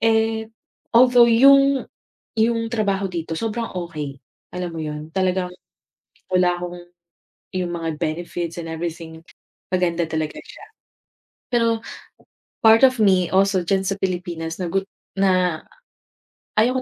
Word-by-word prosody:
Eh, 225 Hz, 0 st, +1 dB, 0.5 s
although 245 Hz, 0 st, +7 dB
yung 275 Hz, +3 st, +5 dB, 0.5 s
yung 230 Hz, 0 st, +1 dB
trabaho 200 Hz, -4 st, 0 dB
dito 165 Hz, -1 st, -4 dB
sobrang 225 Hz, +3 st, -3 dB
okey, 155 Hz, -6 st, -5 dB, 0.4 s
alam 180 Hz, -1 st, -3 dB
mo 165 Hz, -, -5 dB
yun? 150 Hz, 0 st, -6 dB
Talagang 185 Hz, -1 st, 0 dB, 0.8 s
wala 180 Hz, -1 st, +3 dB
akong 175 Hz, 0 st, -6 dB, 0.7 s
yung 180 Hz, -2 st, -2 dB
mga 165 Hz, -2 st, -4 dB
benefits 170 Hz, +1 st, -3 dB
and 165 Hz, -1 st, -6 dB
everything, 160 Hz, 0 st, -6 dB, 0.5 s
maganda 175 Hz, -2 st, +1 dB
talaga 155 Hz, -1 st, -3 dB
siya. -, -, -13 dB, 0.9 s
Pero 230 Hz, -1 st, +2 dB, 0.8 s
part 225 Hz, +2 st, +6 dB
of 255 Hz, -2 st, +2 dB
me 185 Hz, -4 st, +3 dB
also 190 Hz, -1 st, +3 dB
diyan 190 Hz, +2 st, +1 dB
sa 195 Hz, -, 0 dB
Pilipinas 175 Hz, -3 st, -3 dB
na 180 Hz, -, -1 dB
gut 195 Hz, +2 st, -1 dB, 0.3 s
na 185 Hz, -4 st, +2 dB, 1.0 s
ayaw 250 Hz, +4 st, +3 dB
185 Hz, 120 wpm, -22 LUFS, 170-225 Hz, 1.0 s, although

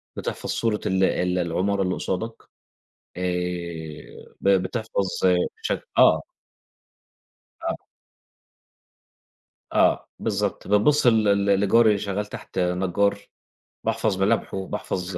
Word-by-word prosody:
بتحفظ -, -, -5 dB
صورة 110 Hz, -2 st, 0 dB
ال 95 Hz, 0 st, +1 dB
ال 90 Hz, -1 st, +1 dB
العمارة 95 Hz, +4 st, 0 dB
اللي 90 Hz, -1 st, 0 dB
قصادك 110 Hz, +5 st, -4 dB, 0.7 s
آآ، 90 Hz, -3 st, -5 dB
ب 100 Hz, -, 0 dB
بتحفظ 100 Hz, +2 st, 0 dB, 0.6 s
شك -, -, -3 dB
آه. -, -, +6 dB, 1.5 s
آه. -, -, -2 dB, 2.0 s
آه، -, -, +3 dB
بالضبط 105 Hz, -2 st, -2 dB
بتبُصّ 120 Hz, +8 st, +3 dB
ل 110 Hz, -2 st, +5 dB
ل 100 Hz, -1 st, +2 dB
لجاري 110 Hz, +3 st, +5 dB
اللي 105 Hz, -2 st, +2 dB
شغال 100 Hz, +1 st, -2 dB
تحت 105 Hz, -2 st, -7 dB
نجّار، 95 Hz, +3 st, +1 dB, 0.6 s
باحفظ 95 Hz, -3 st, 0 dB
ملامحُه، 95 Hz, -3 st, 0 dB
باحفظ 90 Hz, 0 st, -4 dB
95 Hz, 105 wpm, -24 LUFS, 90-105 Hz, 2.0 s, آه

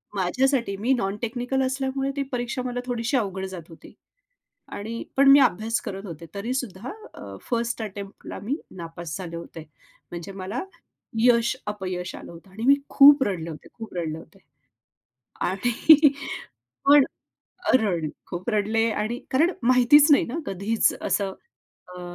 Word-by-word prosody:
माझ्यासाठी 235 Hz, +4 st, +1 dB
मी 255 Hz, -, +2 dB
non 195 Hz, -3 st, -1 dB
technical 245 Hz, +3 st, -1 dB
असल्यामुळे 270 Hz, +1 st, -1 dB
ती 280 Hz, -, -1 dB
परीक्षा 245 Hz, 0 st, -2 dB
मला 245 Hz, 0 st, -3 dB
थोडीशी 245 Hz, +2 st, -1 dB
अवघड 190 Hz, -4 st, -2 dB
जात 170 Hz, -2 st, -9 dB
होती 165 Hz, -, -14 dB, 0.8 s
आणि 225 Hz, +3 st, -5 dB
पण 275 Hz, 0 st, +6 dB
मी 280 Hz, -, +9 dB
अभ्यास 225 Hz, -2 st, +2 dB
करत 195 Hz, +1 st, -6 dB
होते. 170 Hz, -3 st, -8 dB
तरी 230 Hz, +6 st, -3 dB
सुद्धा 240 Hz, -3 st, -4 dB, 0.2 s
अ, -, -, -9 dB
फर्स्ट 235 Hz, -1 st, -1 dB
अटेम्प्टला 200 Hz, -1 st, -8 dB
मी 250 Hz, +7 st, -1 dB, 0.2 s
नापास 165 Hz, -1 st, -6 dB
झाले 175 Hz, -3 st, -7 dB
होते. 165 Hz, -1 st, -9 dB, 0.5 s
म्हणजे 175 Hz, +2 st, -7 dB
मला 205 Hz, +7 st, -3 dB, 0.6 s
यश 235 Hz, +1 st, +4 dB, 0.2 s
अपयश 185 Hz, -3 st, -5 dB
आलं -, -, -10 dB
होतं. 170 Hz, +3 st, -14 dB
आणि 220 Hz, +4 st, -7 dB
मी 275 Hz, +2 st, +7 dB
खूप 285 Hz, 0 st, +8 dB
रडले 170 Hz, -7 st, -3 dB
होते. 155 Hz, -, -9 dB
खूप 225 Hz, -1 st, -9 dB
रडले 160 Hz, -3 st, -3 dB
होते. 160 Hz, -, -15 dB, 1.1 s
आणि 245 Hz, -, +5 dB, 0.8 s
पण 285 Hz, -1 st, +8 dB, 0.7 s
रड 185 Hz, -9 st, +1 dB, 0.2 s
खूप 180 Hz, +6 st, -4 dB
रडले 220 Hz, +1 st, +1 dB, 0.2 s
आणि 230 Hz, +4 st, -2 dB
कारण 315 Hz, +7 st, +3 dB, 0.2 s
माहितीच 255 Hz, +4 st, +6 dB
नाही 285 Hz, -, +5 dB
ना 255 Hz, +7 st, -5 dB
कधीच 205 Hz, +3 st, +1 dB
असं 195 Hz, -2 st, 0 dB, 0.6 s
अ, 180 Hz, -, -8 dB
225 Hz, 145 wpm, -25 LUFS, 190-255 Hz, 1.1 s, मी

